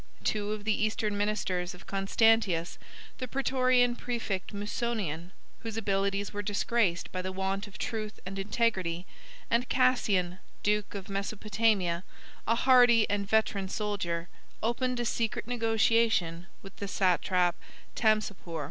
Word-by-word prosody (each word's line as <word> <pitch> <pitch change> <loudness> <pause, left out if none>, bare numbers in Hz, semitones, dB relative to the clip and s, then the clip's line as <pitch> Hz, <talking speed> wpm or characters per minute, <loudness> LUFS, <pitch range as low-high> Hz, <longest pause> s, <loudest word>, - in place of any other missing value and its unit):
Two 210 -1 0
of 215 -1 -4
the 215 0 +2
eastern 215 -1 0
ministers 195 -4 -1
of 180 - -15
Constantius, 195 -3 +2 0.4
the 255 - -3
Prætorian 255 -2 +2
præfect 230 -7 -3
Musonian, 205 -5 -3 0.3
whose 225 -1 -6
abilities 200 -1 0
were 205 - -2
disgraced 205 -2 0
by 185 - -3
the 185 +1 -4
want 195 +2 -2
of 195 - -11
truth 215 -2 -4
and 195 +1 -5
integrity, 195 -4 0 0.5
and 235 +2 +2
Cassian, 200 -8 +2 0.2
duke 210 0 0
of 195 -1 -6
Mesopotamia, 200 -2 0 0.4
a 230 - +3
hardy 245 -3 +6
and 200 -1 -1
veteran 205 -3 +1
soldier, 185 -5 -2 0.4
opened 245 +2 0
a 240 - -1
secret 225 -1 -1
negotiation 225 -6 +2 0.2
with 195 -1 -11
the 200 - -4
satrap 180 -2 +2 0.4
Tamsapor. 210 -7 0
205 Hz, 130 wpm, -30 LUFS, 190-225 Hz, 0.5 s, hardy